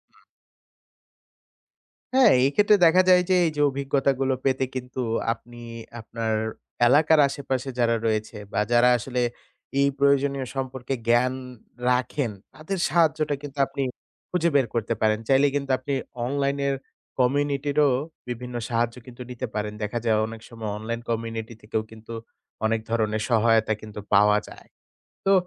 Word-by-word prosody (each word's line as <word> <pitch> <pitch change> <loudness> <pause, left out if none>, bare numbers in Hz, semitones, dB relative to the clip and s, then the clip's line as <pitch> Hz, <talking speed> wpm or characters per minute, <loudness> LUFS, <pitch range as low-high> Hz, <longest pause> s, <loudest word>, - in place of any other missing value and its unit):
হুম। - - -26 1.9
হ্যাঁ, 265 -1 +7
এক্ষেত্রে 205 +9 +4
দেখা 175 +3 +6
যায় 180 0 +7
যে, 185 - +4
এই 160 - +1
যে 145 - 0
অভিজ্ঞতাগুলো 135 -1 0
পেতে 130 0 +2
কিন্তু 125 0 -4 0.3
আপনি 120 0 -15 0.4
আপনার 110 0 -3 0.5
এলাকার 155 +4 +5
আশেপাশে 135 -2 -3
যারা 115 -1 +3
রয়েছে, 110 0 -1 0.2
বা - - +1
যারা 120 +1 +5
আসলে 125 +1 -2 0.6
এই 140 - +4
প্রয়োজনীয় 140 -1 +2
সম্পর্কে 130 -1 -3
জ্ঞান 120 +2 +3 0.6
রাখেন। 125 0 0 0.2
তাদের 175 +5 -4
সাহায্যটা 155 -3 +2
কিন্তু 145 -1 -9
আপনি 135 0 -3 0.5
খুঁজে 170 -1 +2
বের 135 -3 +5
করতে 115 0 0
পারেন। 110 0 +2
চাইলে 135 +1 +5
কিন্তু 140 -1 -1
আপনি 140 +2 -4 0.3
online 140 +1 0
এর 140 - +1 0.4
community-র 140 +2 +1
ও - - +4 0.4
বিভিন্ন 125 0 -5
সাহায্য 120 0 0
কিন্তু 125 0 -11
নিতে 120 - -4
পারেন। 105 0 -2
দেখা 110 +3 -2
যায় 110 -2 +3
অনেক 115 0 -9
সময় 115 -2 -6
online 115 +2 -4
community 115 0 -3
থেকেও 110 +1 -2
কিন্তু 110 +1 -10 0.5
অনেক 115 0 +2
ধরনের 110 -2 0
সহায়তা 115 -1 +3
কিন্তু 105 -1 -8
পাওয়া 105 +1 +6
যায়। - - -14 0.6
তো 195 - +6
125 Hz, 140 wpm, -25 LUFS, 115-140 Hz, 1.9 s, হ্যাঁ